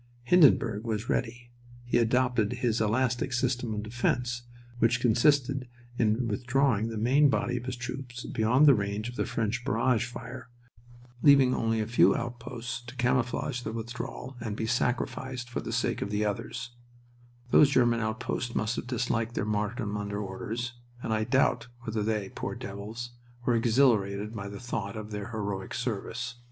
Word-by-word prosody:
Hindenburg 120 - +5
was 110 -1 -3
ready. 120 0 -2 0.3
He 120 0 +2
adopted 120 -1 +2
his 120 -3 0
"elastic 125 +4 +1
system 120 -1 0
of 105 - -3
defense," 120 +2 -1 0.4
which 115 0 +3
consisted 130 +2 +3 0.3
in 115 +2 +2
withdrawing 120 -1 +1
the 115 - -4
main 135 +7 +4
body 125 -2 0
of 120 - -5
his 130 - -2
troops 125 0 -6
beyond 120 +6 +3
the 145 - +9
range 105 +1 -2
of 120 - -9
the - - -1
French 115 +3 -1
barrage 120 -1 +2
fire, 125 +1 -8 0.7
leaving 135 -3 +6
only 115 -1 +1
a 110 - 0
few 120 +2 +4
outposts 120 0 -5
to 120 - -9
camouflage 125 +1 0
the 110 - -4
withdrawal 120 +3 -6
and 110 -3 -4
be 110 - -2
sacrificed 125 +1 -1
for - - -2
the - - -5
sake - - 0
of 100 - -2
the 105 +1 0
others 115 +3 -3 0.8
(those 145 - +7
German 120 -4 +3
outposts 115 +2 -2
must 110 +2 0
have - - -4
disliked 120 -2 -1
their - - 0
martyrdom 105 +1 -1
under 105 0 -3
orders, 110 +5 -4 0.3
and 110 - -1
I 110 0 +1
doubt 120 -1 +2
whether 110 -2 -2
they, 105 -2 -1
poor - - -5
devils, 110 +5 -6 0.3
were 125 - +3
exhilarated 110 -4 +2
by 100 -2 -5
the 100 0 -8
thought 110 -4 -4
of 110 0 -7
their 105 0 -4
heroic 100 -4 -4
service). 120 0 -3
120 Hz, 165 wpm, -29 LUFS, 110-125 Hz, 0.8 s, the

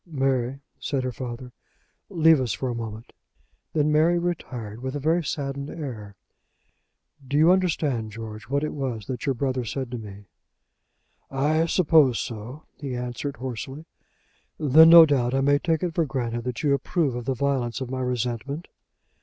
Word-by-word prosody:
"Mary," 135 -3 -1 0.2
said 135 -3 -2
her 130 - -2
father, 125 0 -7 0.6
"leave 160 -5 +4
us 125 - -1
for 130 - -3
a - - -2
moment." 115 -1 -7 0.6
Then 150 -1 +2
Mary 160 +3 +4
retired, 125 -11 -4
with 130 +2 -4
a - - -2
very 165 +4 +1
saddened 140 -1 -4
air. 115 -11 -7 1.1
"Do 140 - 0
you 160 +3 +6
understand, 155 -11 0
George, 110 0 -8
what 140 +2 0
it 155 - -2
was 125 -7 -4
that 130 +5 -5
your 135 - +1
brother 130 0 -1
said 125 +2 -4
to 125 - -4
me?" 100 -2 -10 1.0
"I 155 +4 +1
suppose 155 -8 +4
so," 120 +6 -6
he 135 -4 -5
answered, 125 +3 -4
hoarsely. 130 +4 -6 0.7
"Then, 155 +2 +7
no 165 -1 +11
doubt, 130 -4 +1
I 135 - +2
may 145 +1 +3
take 160 0 0
it 175 -2 -1
for 165 -2 +1
granted 120 -3 -3
that 125 +2 -4
you 145 -2 +3
approve 140 +1 0
of 120 -1 -5
the 135 - -1
violence 130 -2 -1
of 130 -2 -5
my 130 0 -2
resentment? 125 +5 -3
135 Hz, 170 wpm, -25 LUFS, 120-150 Hz, 1.1 s, no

